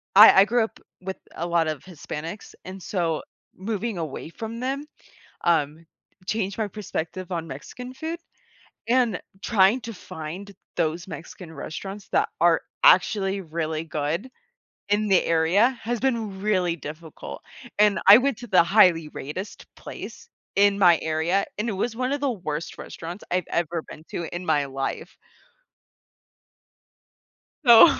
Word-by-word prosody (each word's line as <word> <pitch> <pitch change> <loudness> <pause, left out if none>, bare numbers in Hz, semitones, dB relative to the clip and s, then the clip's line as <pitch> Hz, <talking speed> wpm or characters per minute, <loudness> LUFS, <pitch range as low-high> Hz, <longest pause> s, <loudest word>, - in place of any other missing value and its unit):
I 210 +3 +11
I - - +6
grew 235 +1 +2
up 220 - -6 0.2
with 190 +1 -5 0.2
a 170 - -3
lot 170 -2 +2
of 155 -3 -3
Hispanics, 170 +1 -7
and 185 0 -8
so 170 -5 -1 0.3
moving 215 +1 -3
away 160 -1 -5
from 225 +6 -6
them, 275 +3 -2 0.6
um, 160 -1 +1 0.4
changed 200 -3 -1
my 215 - +1
perspective 185 -3 -5
on 165 -1 -3
Mexican 250 - -8
food, 320 +5 -5 0.7
and 240 -5 +3 0.2
trying 210 +2 +4
to 230 +1 -6
find 180 +3 -8 0.2
those 170 +1 -1
Mexican 170 -1 -9
restaurants 195 +7 -7
that - - +2
are - - +5 0.2
actually 200 - +5
really 160 -1 -3
good 155 - -2 0.6
in 210 +1 +2
the 190 -2 +4
area 170 +9 +4
has 235 +1 -1
been 225 -7 -1
really 185 -5 +1
difficult, 155 +1 -8 0.4
and 210 -1 +5
I 200 +3 +11
went 270 -1 +1
to 240 - -8
the 185 - +6 0.5
highly-rated 185 +9 -6
place 465 - -9 0.3
in 200 0 +4
my 175 -4 +6
area, 160 +5 +1
and 215 +3 -2
it - - -2
was 220 +4 -2
one 255 +2 -1
of 285 - -1
the 280 -2 +1
worst 170 -7 -4
restaurants 170 +4 -8
I've 180 0 0
ever 170 -1 -1
been 155 - -11
to 170 - -4
in 180 - -5
my 145 -3 +2
life 135 0 -4 2.5
so 235 +4 +10
190 Hz, 145 wpm, -25 LUFS, 165-220 Hz, 2.5 s, I